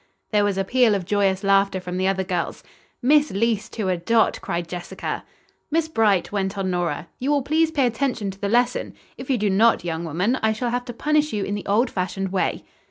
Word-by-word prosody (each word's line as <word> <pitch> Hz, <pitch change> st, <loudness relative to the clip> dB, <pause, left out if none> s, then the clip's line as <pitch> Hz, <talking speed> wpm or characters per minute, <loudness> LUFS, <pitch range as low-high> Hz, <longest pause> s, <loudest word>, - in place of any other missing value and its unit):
There 210 Hz, -1 st, +3 dB
was 205 Hz, -2 st, 0 dB
a 195 Hz, -, +1 dB
peal 240 Hz, +1 st, +3 dB
of 190 Hz, -3 st, -3 dB
joyous 195 Hz, 0 st, +1 dB
laughter 195 Hz, -1 st, +3 dB
from 180 Hz, 0 st, -5 dB
the 185 Hz, +1 st, +1 dB
other 190 Hz, 0 st, +1 dB
girls. 180 Hz, -2 st, -3 dB, 0.4 s
"Miss 295 Hz, +3 st, +4 dB
Leece 215 Hz, +1 st, 0 dB
to 215 Hz, -4 st, -2 dB
a 185 Hz, -1 st, +1 dB
dot," 225 Hz, +6 st, +2 dB
cried 170 Hz, 0 st, -3 dB
Jessica. 175 Hz, 0 st, -5 dB, 0.5 s
"Miss 320 Hz, +1 st, +1 dB
Bright," 215 Hz, -, +2 dB
went 200 Hz, 0 st, -2 dB
on 190 Hz, -1 st, -1 dB
Nora, 175 Hz, -3 st, -2 dB
"you 260 Hz, -, -2 dB
will 290 Hz, -2 st, +2 dB
please 315 Hz, +3 st, +2 dB
pay 290 Hz, -5 st, +1 dB
attention 235 Hz, -4 st, -1 dB
to 195 Hz, -, -16 dB
the 200 Hz, -, -1 dB
lesson. 245 Hz, +2 st, +1 dB, 0.2 s
If 255 Hz, -, -8 dB
you 260 Hz, -, +2 dB
do 205 Hz, -2 st, +1 dB
not, 220 Hz, +2 st, +4 dB
young 165 Hz, -1 st, -3 dB
woman, 180 Hz, -, 0 dB
I 220 Hz, 0 st, +2 dB
shall 235 Hz, +2 st, -2 dB
have 245 Hz, 0 st, -2 dB
to 240 Hz, -, -6 dB
punish 300 Hz, +3 st, +1 dB
you 205 Hz, -2 st, -1 dB
in 200 Hz, -, -3 dB
the 205 Hz, -, -5 dB
old 230 Hz, +5 st, +2 dB
fashioned 190 Hz, +1 st, -2 dB
way." 190 Hz, -, -1 dB
205 Hz, 225 wpm, -23 LUFS, 190-245 Hz, 0.5 s, Miss